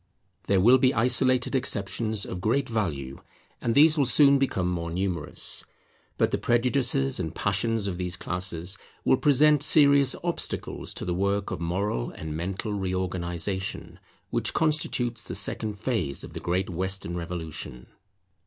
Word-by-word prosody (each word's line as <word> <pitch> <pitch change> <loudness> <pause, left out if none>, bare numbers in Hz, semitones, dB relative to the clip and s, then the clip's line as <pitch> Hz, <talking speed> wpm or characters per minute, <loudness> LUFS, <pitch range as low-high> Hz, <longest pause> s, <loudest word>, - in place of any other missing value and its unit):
There 100 -1 +3
will 120 +7 +6
be 130 +2 +3
isolated 125 +2 +2
exceptions 110 -3 -1
of 90 - -6
great 135 +8 +1
value, 75 - -3 0.4
and 115 -1 0
these 155 +2 +6
will 140 - +3
soon 140 +1 +6
become 100 -9 0
more 85 -2 -2
numerous: 90 -2 -1 0.5
but - - +2
the - - -1
prejudices 120 - +1
and 80 -2 -4
passions 105 +2 0
of 95 -3 -3
these 90 -1 -2
classes 90 +1 -4 0.3
will - - +5
present 150 +1 +4
serious 140 -3 +5
obstacles 175 -1 -2
to - - -5
the 90 - -1
work 100 +2 -1
of - - -4
moral 85 -8 -2
and 80 -1 -7
mental 95 +5 -3
reorganization 95 -1 -3 0.3
which - - -1
constitutes 125 -7 0
the 90 - -5
second 105 +1 -2
phase 100 - -2
of - - -10
the - - -5
great 90 +2 -1
Western 95 0 -2
revolution. 80 -7 -6
100 Hz, 145 wpm, -26 LUFS, 90-125 Hz, 0.5 s, will